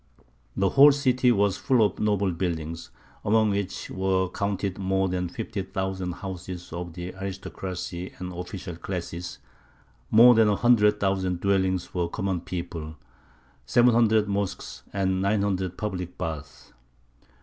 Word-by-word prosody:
The 95 Hz, 0 st, +3 dB
whole 140 Hz, +2 st, +8 dB
city 130 Hz, -3 st, +2 dB
was 100 Hz, -3 st, +2 dB
full 125 Hz, -5 st, +3 dB
of -, -, -3 dB
noble 100 Hz, -3 st, +1 dB
buildings, 85 Hz, -2 st, -3 dB, 0.3 s
among 110 Hz, 0 st, +3 dB
which 100 Hz, -1 st, -3 dB
were 95 Hz, -1 st, 0 dB
counted 100 Hz, 0 st, -2 dB
more 95 Hz, 0 st, +1 dB
than 90 Hz, -1 st, -2 dB
fifty 110 Hz, +1 st, -4 dB
thousand 95 Hz, -2 st, -3 dB
houses 90 Hz, -2 st, -7 dB
of 85 Hz, -1 st, -5 dB
the 90 Hz, +1 st, -6 dB
aristocracy 95 Hz, -1 st, -6 dB
and 90 Hz, 0 st, -6 dB
official 90 Hz, 0 st, -6 dB
classes, 85 Hz, -1 st, -5 dB, 0.7 s
more 120 Hz, +3 st, +8 dB
than 110 Hz, -2 st, +5 dB
a 105 Hz, -, +3 dB
hundred 105 Hz, -3 st, +4 dB
thousand 95 Hz, -2 st, 0 dB
dwellings 95 Hz, -2 st, +1 dB
for 90 Hz, -1 st, -2 dB
the -, -, -5 dB
common 95 Hz, -3 st, -1 dB
people, 85 Hz, -3 st, -6 dB, 0.7 s
seven 120 Hz, -, +5 dB
hundred 110 Hz, -2 st, +4 dB
mosques, 100 Hz, -1 st, -3 dB
and 95 Hz, -1 st, 0 dB
nine 100 Hz, +1 st, +1 dB
hundred 95 Hz, -3 st, -1 dB
public 90 Hz, -4 st, -4 dB
baths. 75 Hz, -3 st, -6 dB
95 Hz, 140 wpm, -26 LUFS, 90-105 Hz, 0.7 s, whole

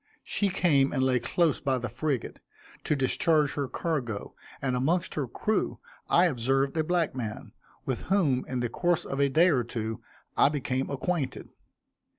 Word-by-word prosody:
She 205 Hz, -, 0 dB
came 150 Hz, -8 st, +3 dB
and 130 Hz, -2 st, 0 dB
lay 130 Hz, -1 st, +3 dB
close 160 Hz, +5 st, +1 dB
by 135 Hz, -3 st, 0 dB
the 120 Hz, 0 st, -3 dB
frigate, 130 Hz, +1 st, -3 dB, 0.5 s
to 150 Hz, -, +2 dB
discharge 150 Hz, +2 st, +2 dB
her 140 Hz, -2 st, -2 dB
cargo, 130 Hz, -7 st, -3 dB, 0.3 s
and 130 Hz, -2 st, -1 dB
amongst 165 Hz, +8 st, 0 dB
her 145 Hz, -4 st, -2 dB
crew 215 Hz, -, -1 dB, 0.3 s
I 175 Hz, -, +5 dB
observed 135 Hz, -1 st, +1 dB
a 160 Hz, -, +2 dB
black 170 Hz, 0 st, 0 dB
man, 115 Hz, -5 st, -5 dB, 0.3 s
with 130 Hz, -, -2 dB
whom, 155 Hz, -10 st, +2 dB
in 125 Hz, -1 st, -2 dB
the 120 Hz, -, -1 dB
course 175 Hz, +6 st, 0 dB
of 135 Hz, -, -4 dB
a 140 Hz, 0 st, +3 dB
day 165 Hz, +7 st, +5 dB
or 125 Hz, -5 st, +2 dB
two, 115 Hz, -2 st, -4 dB, 0.3 s
I -, -, +5 dB
became 135 Hz, -2 st, -2 dB
acquainted. 140 Hz, 0 st, -2 dB
135 Hz, 165 wpm, -28 LUFS, 125-160 Hz, 0.5 s, I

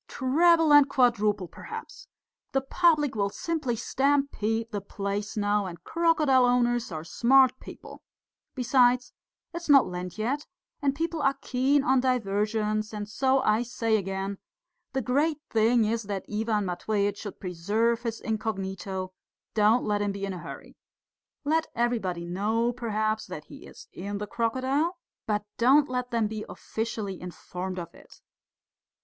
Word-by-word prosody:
"Treble 320 Hz, +4 st, +4 dB
and 290 Hz, -1 st, +7 dB
quadruple 215 Hz, -7 st, +2 dB
perhaps! -, -, -9 dB, 0.5 s
The 270 Hz, -, +2 dB
public 305 Hz, 0 st, +2 dB
will 200 Hz, -2 st, 0 dB
simply 300 Hz, 0 st, -2 dB
stampede 245 Hz, -4 st, 0 dB
the 205 Hz, -2 st, -3 dB
place 200 Hz, +1 st, -4 dB
now, 205 Hz, -1 st, +1 dB
and 170 Hz, -1 st, -9 dB
crocodile 315 Hz, -6 st, +3 dB
owners 240 Hz, -2 st, +1 dB
are 155 Hz, -1 st, -5 dB
smart 260 Hz, +8 st, +4 dB
people. -, -, -11 dB, 0.5 s
Besides, 250 Hz, -1 st, +3 dB, 0.4 s
it's 340 Hz, -1 st, -6 dB
not 275 Hz, -2 st, +7 dB
Lent 180 Hz, 0 st, -6 dB
yet, 265 Hz, +8 st, -2 dB, 0.3 s
and 280 Hz, -1 st, +1 dB
people 330 Hz, +1 st, -2 dB
are 275 Hz, -1 st, +2 dB
keen 270 Hz, +3 st, +2 dB
on 265 Hz, -2 st, +3 dB
diversions, 215 Hz, -3 st, 0 dB
and 205 Hz, -1 st, -4 dB
so 265 Hz, +5 st, +2 dB
I 215 Hz, +2 st, +3 dB
say 230 Hz, -2 st, 0 dB
again, 195 Hz, 0 st, -3 dB, 0.5 s
the 265 Hz, -1 st, -1 dB
great 290 Hz, +6 st, +1 dB
thing 225 Hz, +1 st, +3 dB
is 225 Hz, +1 st, 0 dB
that 195 Hz, -2 st, -3 dB
Ivan 215 Hz, -1 st, -1 dB
Matveitch 200 Hz, +3 st, -1 dB
should 205 Hz, -, -8 dB
preserve 210 Hz, +7 st, 0 dB
his 230 Hz, -2 st, -3 dB
incognito, 195 Hz, -3 st, -3 dB, 0.4 s
don't 215 Hz, +3 st, +3 dB
let 205 Hz, -1 st, 0 dB
him 205 Hz, -1 st, 0 dB
be 200 Hz, 0 st, -4 dB
in 195 Hz, -, -4 dB
a 180 Hz, -, -6 dB
hurry. -, -, -10 dB, 0.7 s
Let 320 Hz, +2 st, +1 dB
everybody 220 Hz, -8 st, -1 dB
know, 220 Hz, +7 st, 0 dB
perhaps, 215 Hz, -2 st, -1 dB
that -, -, -7 dB
he -, -, -12 dB
is -, -, -13 dB
in 200 Hz, +2 st, -5 dB
the 210 Hz, -, -4 dB
crocodile, 260 Hz, -, 0 dB, 0.3 s
but 210 Hz, -1 st, 0 dB
don't 270 Hz, +5 st, +5 dB
let 250 Hz, -1 st, -3 dB
them 230 Hz, -2 st, +1 dB
be 215 Hz, 0 st, -4 dB
officially 220 Hz, -4 st, -4 dB
informed 180 Hz, +1 st, -6 dB
of 170 Hz, -2 st, -6 dB
it. -, -, -17 dB
225 Hz, 145 wpm, -27 LUFS, 205-265 Hz, 0.7 s, and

